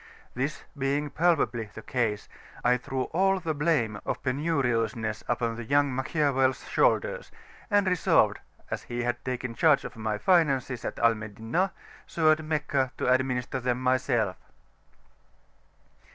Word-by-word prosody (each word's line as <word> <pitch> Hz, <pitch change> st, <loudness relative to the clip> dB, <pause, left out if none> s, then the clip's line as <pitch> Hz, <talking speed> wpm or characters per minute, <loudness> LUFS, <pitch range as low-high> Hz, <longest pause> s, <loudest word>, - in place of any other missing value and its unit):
This 140 Hz, +5 st, -3 dB
being 140 Hz, +1 st, -1 dB
palpably 125 Hz, -10 st, +1 dB
the 110 Hz, -, -10 dB
case, 110 Hz, -5 st, -1 dB, 0.4 s
I 125 Hz, 0 st, +4 dB
threw 130 Hz, +1 st, -3 dB
all 195 Hz, +2 st, +3 dB
the 160 Hz, -3 st, -2 dB
blame 145 Hz, -9 st, 0 dB
of -, -, -4 dB
penuriousness 125 Hz, -6 st, -1 dB
upon 115 Hz, -1 st, -1 dB
the 120 Hz, -, -5 dB
young 140 Hz, +2 st, +2 dB
Machiavel's 135 Hz, -1 st, 0 dB
shoulders, -, -, +1 dB, 0.4 s
and 205 Hz, -2 st, +3 dB
resolved, 180 Hz, -3 st, +3 dB, 0.3 s
as -, -, -2 dB
he 120 Hz, 0 st, -4 dB
had 120 Hz, 0 st, -2 dB
taken 125 Hz, -2 st, -3 dB
charge 150 Hz, +4 st, +3 dB
of -, -, -7 dB
my 110 Hz, -1 st, -2 dB
finances 135 Hz, -, +2 dB
at -, -, -4 dB
Al 115 Hz, 0 st, +4 dB
Madinah, 110 Hz, -, -2 dB, 0.4 s
so 160 Hz, -2 st, +3 dB
at 155 Hz, +1 st, +1 dB
Meccah 150 Hz, -4 st, -1 dB
to 125 Hz, -, +2 dB
administer 130 Hz, -1 st, -1 dB
them 125 Hz, 0 st, -1 dB
myself. 125 Hz, -6 st, +1 dB
130 Hz, 140 wpm, -27 LUFS, 120-155 Hz, 0.4 s, I